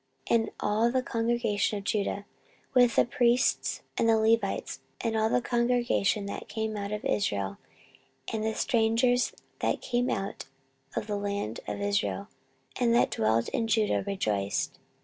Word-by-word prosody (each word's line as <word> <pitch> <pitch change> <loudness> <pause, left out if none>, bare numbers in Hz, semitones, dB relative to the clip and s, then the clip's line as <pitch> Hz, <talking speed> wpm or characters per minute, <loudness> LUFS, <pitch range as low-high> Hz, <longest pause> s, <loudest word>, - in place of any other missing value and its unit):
14:030:025 235 - +6
And 225 - -4
all 220 +3 +2
the 255 0 +1
congregation 230 -3 0
of 200 - -6
Judah, 200 0 -1 0.5
with 245 -3 +5
the - - +5
priests 235 - +1 0.2
and 230 - +3
the 225 - +5
Levites, 225 +1 +1 0.2
and 230 -1 -1
all 220 0 +2
the 245 - +1
congregation 240 -4 +1
that 200 - -6
came 220 -1 -2
out 200 0 -4
of 210 0 -4
Israel, 100 - -1 0.7
and 220 -1 -1
the 220 0 -1
strangers 245 0 +2 0.3
that - - 0
came 245 0 0
out 195 0 -3 0.5
of 230 - -1
the 205 -1 -2
land 200 - -3
of - - -3
Israel, 200 0 -1 0.5
and 235 -2 +3
that 240 - +3
dwelt 110 +1 +1
in 230 - -1
Judah, 220 -1 +2
rejoiced. 100 - -1
220 Hz, 155 wpm, -28 LUFS, 200-235 Hz, 0.7 s, 14:030:025